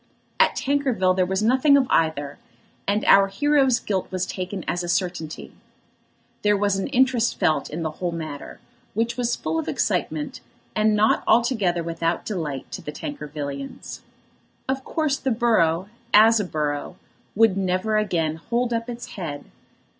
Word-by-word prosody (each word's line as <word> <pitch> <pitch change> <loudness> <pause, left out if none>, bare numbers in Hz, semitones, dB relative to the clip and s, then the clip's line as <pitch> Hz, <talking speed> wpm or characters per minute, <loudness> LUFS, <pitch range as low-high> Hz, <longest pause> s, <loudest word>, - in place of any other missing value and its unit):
At - - +4
Tankerville 260 -10 +1
there 185 -1 +2
was 190 +2 -1
nothing 260 +5 +5
of 270 - +3
either, 145 -3 0 0.5
and 205 +2 +1
our 195 0 +7
hero's 270 +3 +2
guilt 190 -3 -2
was 185 -1 -2
taken 185 0 -5
as 175 0 -1
a 175 - -4
certainty. 175 -3 -2 0.9
There 210 0 +3
was 200 0 +1
an 195 - -2
interest 255 -3 +2
felt 155 - +1
in 165 +2 -4
the 155 - -2
whole 175 +3 -3
matter 155 -4 -7 0.4
which 230 +2 0
was 245 -1 0
full 160 +1 -2
of 160 - -4
excitement, 155 -2 -1 0.3
and 215 0 +3
not 215 +1 +3
altogether 220 -7 +2
without 165 0 -2
delight 155 - -4
to - - -6
the 150 - -6
Tankervillians. 145 - -6 0.7
Of 265 0 -2
course 305 -3 0
the 265 - -2
borough, 200 -8 +2 0.3
as 225 +2 +7
a 205 - -1
borough, 150 -4 -3 0.4
would 225 -2 +4
never 190 +3 0
again 165 -7 0
hold 235 +8 -1
up 230 +1 -2
its 240 0 -7
head. 155 -7 -6
195 Hz, 155 wpm, -23 LUFS, 165-235 Hz, 0.9 s, our